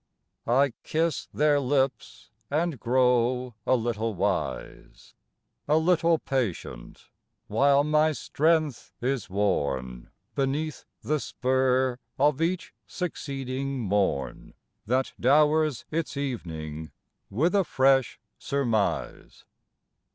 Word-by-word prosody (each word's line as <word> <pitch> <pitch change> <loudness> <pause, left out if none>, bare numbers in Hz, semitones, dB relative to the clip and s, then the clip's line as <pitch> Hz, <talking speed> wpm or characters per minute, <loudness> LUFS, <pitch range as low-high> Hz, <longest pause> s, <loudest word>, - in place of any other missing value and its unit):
I 135 +2 +3
kiss 165 +1 -1
their 150 -1 +3
lips 135 -5 -1 0.2
and 155 -2 -1
grow 125 0 +2
a 130 - +5
little 115 -2 -2
wise, 95 +1 -3 0.5
A 150 +2 +4
little 165 0 +3
patient, 105 - -4 0.3
while 140 +6 +3
my 155 +1 +3
strength 155 -2 0
is 125 -5 -2
worn 70 -11 -1 0.2
Beneath 145 +3 -2 0.2
the 155 0 0
spur 130 -1 +1 0.2
of 145 +2 +2
each 175 +2 -1
succeeding 135 -5 -4
morn 100 - -1 0.3
That 130 +3 0
dowers 150 +1 +3
its 160 -3 -2
evening 80 - -5 0.4
with 155 - +1
a 200 -1 +4
fresh 135 -4 +2 0.2
surmise. 120 -8 -2
135 Hz, 95 wpm, -27 LUFS, 115-150 Hz, 0.5 s, a